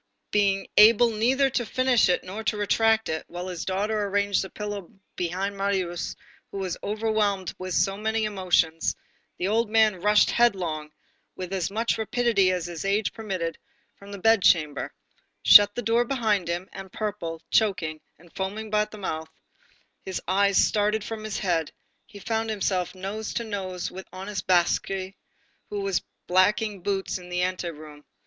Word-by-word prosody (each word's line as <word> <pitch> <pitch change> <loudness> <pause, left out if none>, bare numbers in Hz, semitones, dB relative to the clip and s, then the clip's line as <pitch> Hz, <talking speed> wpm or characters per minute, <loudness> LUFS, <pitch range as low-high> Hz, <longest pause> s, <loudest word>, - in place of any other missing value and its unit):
Being 200 -2 +2
able 230 +2 +7
neither 260 +5 +2
to 245 - 0
finish 250 -1 +2
it 180 - +1
nor 200 +4 -6
to 210 - 0
retract 220 +2 +2
it, 160 0 -2
while 175 +1 -6
his 175 -2 -5
daughter 205 +3 -1
arranged 200 0 +1
the 190 - -6
pillow 205 -3 -6 0.3
behind 185 +3 -2
Marius, 190 -3 -2 0.3
who - - -7
was 190 -3 -2
overwhelmed 210 -3 0
with 185 -1 -4
so 195 0 +1
many 220 +1 -1
emotions, 180 -5 +1 0.4
the 180 - -1
old 225 +2 +1
man 215 -4 +3
rushed 210 +2 +4
headlong, 175 -10 +1 0.5
with 185 0 -6
as 185 -2 -1
much 225 +3 -1
rapidity 220 -4 +2
as 180 -2 -2
his 170 -2 -6
age 200 +2 0
permitted, 185 -7 -4 0.4
from 200 0 -13
the 200 - -6
bed 225 +2 +4
chamber, 155 -6 +2 0.5
shut 205 0 +9
the 245 - -3
door 230 +2 +3
behind 220 -8 0
him, 175 +2 -3
and, 190 -1 -9
purple, 195 -7 -4
choking 170 -8 +1 0.2
and 170 +1 -20
foaming 210 +3 -4
at 210 0 +2
the 215 - -10
mouth, 160 -5 -4 0.7
his 190 - -4
eyes 200 +1 +3
starting 210 +1 +2
from 215 +1 -6
his 215 -1 -4
head, 170 -5 0 0.4
he 215 - -13
found 225 +2 -2
himself 190 -4 -1
nose 200 +4 -5
to 235 - -1
nose 190 -5 -4
with 190 +1 -9
honest 195 +2 -6
Basque, 175 -2 +3 0.8
who 205 -1 -3
was 195 -2 0 0.2
blacking 200 +2 +2
boots 195 0 -2
in 180 0 -12
the 180 0 0
anteroom. 155 -5 -5
200 Hz, 165 wpm, -26 LUFS, 180-215 Hz, 0.8 s, shut